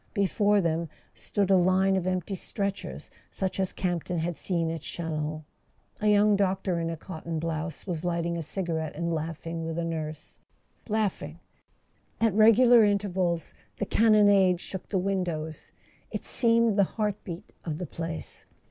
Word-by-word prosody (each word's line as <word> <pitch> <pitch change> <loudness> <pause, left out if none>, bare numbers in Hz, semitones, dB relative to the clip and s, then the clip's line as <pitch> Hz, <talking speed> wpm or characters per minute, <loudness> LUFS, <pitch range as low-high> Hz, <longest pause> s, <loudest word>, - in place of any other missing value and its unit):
Before 205 0 +3
them 165 -1 -1 0.2
stood 200 -1 -1
a - - +7
line 185 +1 +3
of 185 -1 -1
empty 185 +1 -1
stretchers 200 +1 -4 0.2
such 190 0 -3
as 190 -1 0
Campton 175 -1 -2
had 170 +1 -1
seen 165 -2 -1
at 165 -2 -5
Chalons. 155 -2 -4 0.6
A 215 - 0
young 210 0 +5
doctor 190 -2 0
in 165 0 -1
a 165 - -4
cotton 165 -1 -6
blouse 160 0 -3
was 175 -4 -3
lighting 170 -1 -1
a 170 - -2
cigarette 160 -2 -3
and 170 -1 -1
laughing 165 +1 -4
with 165 0 -4
a 170 - -1
nurse— 155 -2 -5 0.5
laughing! 195 -7 -1 0.8
At 225 -3 +3
regular 230 +3 +7
intervals 190 -5 0 0.2
the 205 - -1
cannonade 205 -5 +5
shook 190 0 -7
the 195 - 0
windows; 180 -5 -2 0.4
it - - -5
seemed 230 -3 +3
the - - +7
heart 210 -2 -1
beat 170 -2 -8
of 155 -3 -3
the 180 - -4
place. 165 -1 -6
180 Hz, 155 wpm, -28 LUFS, 165-200 Hz, 0.8 s, a